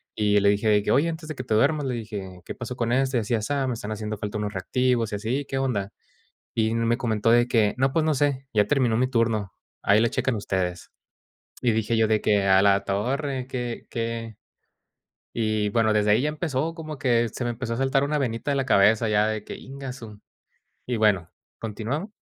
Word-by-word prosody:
y 105 -1 +3
le 100 - +3
dije 105 +2 +2
de 105 -1 +4
que: - - 0
"Oye, 155 +5 +3
antes 160 -1 -6
de 155 - -4
que - - -5
te 110 - -1
duermas", 145 +6 +2
le 130 - -1
dije: 100 -5 -7
"¿Qué - - -6
pasó 120 +1 -6
con 115 -1 -1
este, 130 -1 +2
así 110 +2 -2
y - - +1
asá? 135 +5 -1
Me 125 - -1
están 110 -1 -6
haciendo 110 0 -4
falta 105 +1 -4
unos 105 0 -3
reactivos 120 +3 0
y - - +1
así. 125 +7 -2
¿Qué 135 - -3
onda?". 105 -7 -1 0.6
Y 110 0 +1
me 115 0 +1
comentó 115 -2 +1
de 120 0 +5
que: 110 -4 +2
"No, 135 +1 +1
pues 160 - +2
no 155 - +2
sé, 135 -1 0
ya 105 -1 +3
terminó 125 -6 +2
mi 130 +2 +2
turno, 115 -5 0 0.3
ahí 105 +2 +4
le 115 - +3
checan 135 - 0
ustedes". 95 -4 -3 0.7
Y 120 - +3
dije 110 +1 0
yo 110 -1 +3
de 110 0 +2
que: 100 -2 +2
"A 95 0 +6
la 100 -1 +4
torre, 130 +6 -2
¿qué 120 -3 -4
qué?" 115 -1 -4 1.0
Y 110 -2 0
bueno, 110 0 +2
desde 105 0 +3
ahí 110 +4 +4
ya 150 - +1
empezó 155 0 -2
como 155 -3 -7
que 120 -4 +2
se 120 - -5
me 120 - 0
empezó 115 0 -4
a - - -5
saltar 135 +1 +2
una 150 +1 0
venita 115 -1 -2
de - - +1
la 135 - 0
cabeza 110 0 +4
ya 105 0 +3
de 110 -1 -2
que: - - -8
"Íngasu". 130 -6 -9 0.7
Y 125 - -1
bueno, 100 -6 +2 0.3
continuaba. 115 - -3
115 Hz, 220 wpm, -25 LUFS, 105-130 Hz, 1.0 s, A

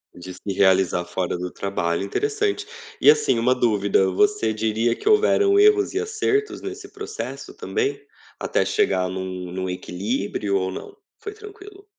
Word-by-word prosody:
De 90 +1 -9
se 90 - -15 0.2
realizar 95 -2 +3
fora 90 -1 -2
do 90 0 -5
trabalho, 85 -3 -2
interessante. 420 - -1 0.3
E - - +8
assim, 445 - +1
uma 125 +3 +3
dúvida, 100 -5 +2
você 205 - +2
diria 110 +2 0
que - - -9
houveram 415 -2 +4
erros 410 -1 +4
e 385 - 0
acertos 425 -1 -1
nesse 390 +2 -7
processo 420 +1 -7
também? 425 -1 -2 0.4
Até - - 0
chegar 420 - +1
em 95 - -5
um 95 -1 -5
em - - -3
um 95 0 -2
equilíbrio 100 +2 -2
ou 95 0 -1
não? 400 - -8 0.2
Foi 415 - -6
tranquilo? 410 -1 -13
125 Hz, 160 wpm, -23 LUFS, -, 0.4 s, E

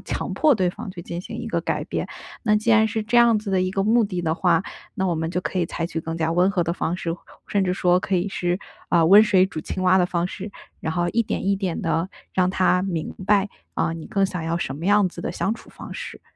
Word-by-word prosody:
强 - - -4
迫 305 -3 +4
对 185 -5 +1
方 205 +3 -8
去 175 -2 -8
进 170 0 -5
行 - - -8
一 - - -5
个 - - -1
改 - - -2
变。 - - -3 0.4
那 210 -3 +3
既 215 +2 0
然 220 0 +5
是 220 +1 -2
这 225 +3 +3
样 235 -2 +5
子 210 -1 -5
的 190 -1 +2
一 185 0 0
个 195 +1 0
目 225 +4 +4
的 185 -4 -3
的 160 -1 0
话， 175 -1 +2 0.3
那 190 -3 -1
我 175 - +1
们 160 0 -2
就 180 - -1
可 185 - -2
以 175 - +1
采 165 0 -3
取 165 -1 -4
更 165 +1 -5
加 165 0 0
温 180 +3 +3
和 185 -4 0
的 170 - -1
方 175 0 -2
式， 165 -2 -3 0.3
甚 200 -1 +1
至 180 -1 0
说 180 -1 +3
可 190 - -2
以 175 +2 0
是， 180 -2 -1 0.3
呃 170 -2 +4
“温 200 +5 +9
水 190 -4 +4
煮 175 -4 -5
青 185 - -4
蛙” 185 0 +5
的 180 - +3
方 175 -1 -1
式。 195 +2 -7 0.3
然 160 - -2
后 175 +1 0
一 235 - +2
点 215 - -3
一 200 0 +2
点 190 -4 -2
地 165 +2 0 0.3
让 185 -1 +3
他 185 -1 +2
明 175 -5 -3
白， 205 -1 +3 0.3
呃 165 - 0
你 165 -1 -8
更 195 -1 +1
想 180 -3 -5
要 165 +1 -1
什 135 -5 -3
么 160 - -7
样 205 0 +4
子 175 -1 -9
的 - - -3
相 195 +4 -1
处 - - -14
方 - - -9
式， - - -7
185 Hz, 295 characters per minute, -23 LUFS, 170-200 Hz, 0.4 s, 温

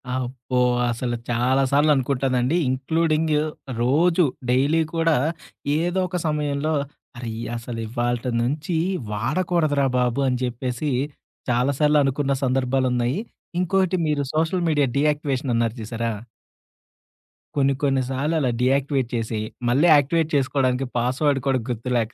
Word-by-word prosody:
అబ్బో! 125 0 -3 0.3
అసలు 120 +1 -2
చాలా 125 +3 +2
సార్లనుకుంటానండి. 135 -1 +2
ఇన్‌క్లూడింగ్ 155 +4 +1 0.5
రోజు 165 +8 +3 0.3
డైలీ 140 +6 +3
కూడా 165 -1 +3 0.6
ఏదో 175 +2 0
ఒక 180 0 -3
సమయంలో 150 0 -1 0.4
అరే 120 -2 -5 0.3
అసలు 115 0 -6
ఇవాళిటి 120 +1 -1
నుంచి 150 +7 -1 0.4
వాడకూడదురా 145 - +1
బాబు 125 +1 +1
అని 125 -1 +1
చెప్పేసి, 125 +3 -2 0.6
చాలా 125 +3 +2
సార్లు 150 0 +4
అనుకున్న 140 +1 0
సందర్భాలున్నాయి. 130 +2 +1 0.4
ఇంకోటి 185 0 +1
మీరు 145 -2 0
సోషల్ 165 +3 +1
మీడియా 145 -3 +2
డీయాక్టివేషన్ 145 -3 0
అన్నారు 115 0 0
చూసారా? 115 +1 -3 1.4
కొన్ని 140 -1 +3
కొన్ని 135 -2 +2
సార్లు 145 +5 -1
అలా 130 -4 +1
డీయాక్టివేట్ 135 -1 +1
చేసి, 110 -1 -2 0.3
మళ్ళీ 145 +8 +4
యాక్టివేట్ 155 +3 +2
చేసుకోవడానికి 135 -1 +1
పాస్‌వర్డ్ 135 +4 +1
కూడా 130 -1 +2
గుర్తులేక, 120 -1 -1
135 Hz, 115 wpm, -23 LUFS, 125-150 Hz, 1.4 s, సార్లు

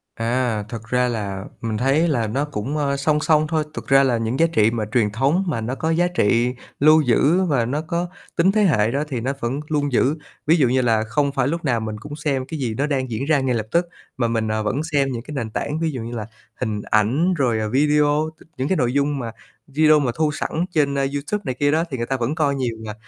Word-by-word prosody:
À, 115 -1 0
thật 115 -2 -6
ra 125 +1 +2
là 100 -5 -3 0.2
mình 115 -2 -2
thấy 135 +8 +2
là 120 -8 0
nó 135 +7 -1
cũng, 140 +1 -4
ờ, 140 -2 0
song 150 +2 +1
song 155 0 +3
thôi, 155 -1 0
thực - - -7
ra 135 0 +5
là 125 -3 +2
những 115 +3 -2
giá 165 - +6
trị 110 -6 +4
mà 115 -2 -2
truyền 115 -5 +2
thống 140 - +1
mà 125 -9 -1
nó 120 +4 -3
có 160 - -2
giá 170 +2 +2
trị 120 -7 +1 0.3
lưu 155 +2 +6
giữ 150 +7 +3
và 135 -9 +1
nó 140 +6 -2
có 170 +2 -2 0.3
tính 180 +3 +4
thế 215 +1 +2
hệ 115 - +3
đó 140 +3 0
thì 130 -5 -3
nó 130 +4 -1
vẫn 120 +4 -2
luôn 145 -2 0
giữ. 130 +4 +2 0.3
Ví 160 - +6
dụ 140 -6 +4
như 130 +2 +2
là 115 -3 +2
không 140 +5 0
phải 135 -2 0
lúc 165 +3 -2
nào 120 -5 +1
mình 110 -1 -4
cũng 145 +5 -8
xem 140 -3 -1
cái 155 +3 -6
gì 120 -5 -1
nó 140 +2 +1
đang 130 -3 -1
diễn 115 +5 -2
ra 150 -1 +3
ngay 130 -2 0
lập 110 -2 -3
tức 170 +1 +2 0.3
mà 120 -2 +1
mình, 115 -1 -1
ờ, 110 0 -1
vẫn 130 +7 -1
xem 140 -2 +2
những 120 -2 -4
cái 150 - -9
nền 115 -5 -3
tảng, 145 +7 -3
ví 165 -1 0
dụ 130 -4 -5
như 115 +1 -6
là 110 -2 -4 0.4
hình 105 -1 -2
ảnh 125 - +2
rồi, 125 -9 +1
ờ, 110 0 -2
video, 150 +3 +2
t - - -16
những 130 +1 -1
cái 190 - +1
nội 125 -4 +1
dung 140 0 +1
mà 115 -3 -4 0.4
video 155 +1 +4
mà 135 -4 0
thu 155 -1 +1
sẵn 160 +2 -2
trên, 145 -4 +1
a, 140 - +1
YouTube 145 +9 -2
này 130 - -2
kia 145 0 +3
đó 160 +2 +2
thì 130 - -3
người 120 - -2
ta 135 - -1
vẫn 125 +5 -1
coi 145 -4 +1
nhiều 125 -4 -2
mà. 105 - -5
135 Hz, 265 wpm, -21 LUFS, 115-150 Hz, 0.4 s, giá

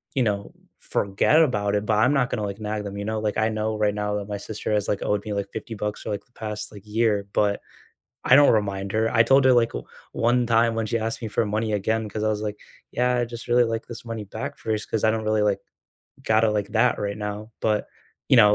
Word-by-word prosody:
you 130 - +3
know, 100 -2 -1 0.3
forget 100 +11 +2
about 105 -8 +1
it, 105 +1 0
but 110 0 +2
I'm 125 +6 +4
not 125 -3 +2
gonna, 105 - -2
like, 100 +1 -4
nag 105 0 -3
them, 100 0 -6
you 100 - -4
know, 110 0 -1
like, 105 -1 -1
I 110 0 +3
know 110 0 -2
right 105 -1 +2
now 105 0 -1
that 100 0 -5
my 105 - -3
sister 105 +1 -4
has, 105 -1 +1
like, 100 - 0
owed 105 -1 0
me 105 - -4
like 100 -1 -2
50 110 +1 -6
bucks 105 0 -3
for, - - -6
like, 105 - -4
the 125 - -37
past, 105 -2 -5
like, 100 - -11
year, 105 -2 +1
but, 100 -1 +1 0.6
I 125 - +7
don't 145 0 +7
remind 100 -3 0
her. 110 +1 +1
I 115 -1 +5
told 135 +2 +4
her, 130 - +7
like, 120 -1 +3 0.4
one 120 +1 +2
time 115 0 +3
when 115 -1 -1
she 115 +2 0
asked 115 +2 -3
me 110 - -4
for 110 - +1
money 110 +1 -1
again, 110 +2 0
'cause 110 - -4
I - - +2
was, 105 0 -1
like, 105 -1 -4 0.3
"Yeah, 125 0 +1
I'd 120 -1 -1
just 120 0 -8
really, 120 0 +5
like, 115 0 -2
this 120 - -8
money 115 -2 -5
back 140 +8 -6
first, 110 -1 -3
'cause 110 -1 +1
I 110 - +5
don't 110 0 -2
really, 110 0 +1
like, 105 -2 +2 0.7
got 110 0 +3
it, 110 - +4
like, 105 -2 -1
that 120 +2 +2
right 100 0 -2
now." 105 +1 -5
But, 105 -1 +1 0.4
you - - +7
know, 105 -1 +7
110 Hz, 260 wpm, -24 LUFS, 105-115 Hz, 0.7 s, I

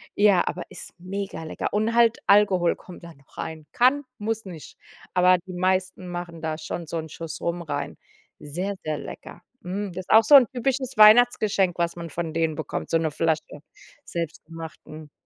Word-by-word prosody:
Ja, 200 -3 +4
aber - - -3
ist - - -11
mega 190 -2 -5
lecker. 155 - -4
Und 220 +3 0
halt 235 -1 +4
Alkohol 195 -4 +4
kommt 180 -1 -13
da 170 -1 -10
noch 140 -1 -25
rein. 160 -1 -6
Kann, 265 +3 +3
muss 220 +1 -3
nicht. 170 -5 -10 0.4
Aber 180 0 +5
die 185 +2 -12
meisten 185 0 -1
machen 175 -2 -6
da 160 -1 -3
schon 165 +1 -6
so 170 - -6
'n 160 - -7
Schuss 160 0 -7
Rum 170 0 -2
rein. 145 -3 -4 0.4
Sehr, 180 +7 -4
sehr 155 -1 -1
lecker. - - -10 0.2
Mm, 195 +3 -3
das 185 +2 -6
ist - - -31
auch 220 +1 +8
so 285 +6 +7
’n 255 -4 +8
typisches 260 +1 -2
Weihnachtsgeschenk, 215 -4 +5
was 170 0 0
man 170 -1 -6
von 160 +1 -4
denen 160 -2 0
bekommt, 155 - -5
so 165 - +3
'ne 160 -2 -1
Flasche 155 -1 -1 0.5
selbstgemachten 160 -2 -7
175 Hz, 180 wpm, -24 LUFS, 160-205 Hz, 0.5 s, auch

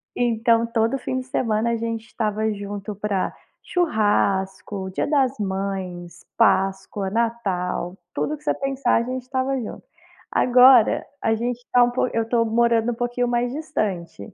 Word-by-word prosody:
Então, 230 -1 +2
todo 230 +3 0
fim 260 - -3
de 255 - -7
semana, 230 -3 0
a - - +1
gente 230 0 -3
estava 215 -1 -1
junto 205 0 -6
pra 200 -2 -2 0.3
churrasco, 200 - 0
Dia 185 - -2
das 275 -3 +1
Mães, 190 -3 -4
Páscoa, 195 -2 +1
Natal, 195 -5 -2 0.2
tudo 305 - -2
que 300 - -23
você - - +2
pensar, 275 0 0
a 230 - +2
gente 255 +1 -4
estava 260 +1 -1
junto. 225 - -7 0.5
Agora, 250 -2 +6 0.2
a 225 - +2
gente 240 +2 -2
tá 245 -1 +7
um 240 - +3
po 255 - 0
eu 230 - +1
tô 230 -1 +2
morando 230 +1 +2
um - - -8
pouquinho 245 +1 -1
mais 240 0 0
distante. 205 - -4
230 Hz, 155 wpm, -23 LUFS, 200-245 Hz, 0.5 s, tá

